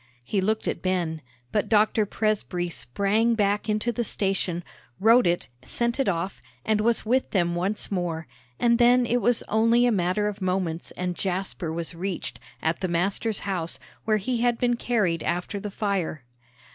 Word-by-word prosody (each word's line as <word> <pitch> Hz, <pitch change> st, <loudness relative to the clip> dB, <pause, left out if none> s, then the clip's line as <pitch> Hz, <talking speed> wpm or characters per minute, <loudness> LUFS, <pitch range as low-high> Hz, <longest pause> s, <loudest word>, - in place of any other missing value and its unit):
He 200 Hz, -, 0 dB
looked 215 Hz, +3 st, 0 dB
at -, -, -2 dB
Ben, 175 Hz, -4 st, -1 dB, 0.3 s
but -, -, 0 dB
Dr. 215 Hz, 0 st, +3 dB
Presbrey 200 Hz, -5 st, -1 dB
sprang 200 Hz, -, +1 dB
back 205 Hz, 0 st, +1 dB
into 215 Hz, +3 st, +1 dB
the 235 Hz, +1 st, -1 dB
station, 190 Hz, -5 st, -1 dB, 0.4 s
wrote 230 Hz, +1 st, +6 dB
it, 175 Hz, 0 st, 0 dB
sent 235 Hz, -, -1 dB
it 270 Hz, -, +2 dB
off, 175 Hz, +1 st, -2 dB, 0.2 s
and 215 Hz, -1 st, +2 dB
was 230 Hz, +1 st, +2 dB
with 255 Hz, +4 st, +2 dB
them 175 Hz, -3 st, +1 dB
once 190 Hz, +6 st, 0 dB
more; 170 Hz, -4 st, -2 dB, 0.3 s
and 235 Hz, 0 st, +3 dB
then 245 Hz, +1 st, +5 dB
it 245 Hz, +1 st, +1 dB
was 240 Hz, +3 st, +2 dB
only 230 Hz, +3 st, +3 dB
a 245 Hz, -, +4 dB
matter 190 Hz, +1 st, +1 dB
of 205 Hz, -1 st, -5 dB
moments 180 Hz, -3 st, -1 dB
and 180 Hz, -1 st, -3 dB
Jasper 185 Hz, -3 st, -2 dB
was 165 Hz, +1 st, -4 dB
reached, 185 Hz, +2 st, -4 dB, 0.2 s
at 160 Hz, +1 st, 0 dB
the 185 Hz, -, -1 dB
master's 195 Hz, +5 st, 0 dB
house, 180 Hz, -4 st, -2 dB, 0.3 s
where 215 Hz, -1 st, +3 dB
he 240 Hz, +5 st, -1 dB
had 240 Hz, -1 st, +2 dB
been 240 Hz, 0 st, +2 dB
carried 210 Hz, -9 st, 0 dB
after 180 Hz, +5 st, -2 dB
the 210 Hz, -, -5 dB
fire. 195 Hz, -, -2 dB
200 Hz, 170 wpm, -26 LUFS, 175-225 Hz, 0.4 s, wrote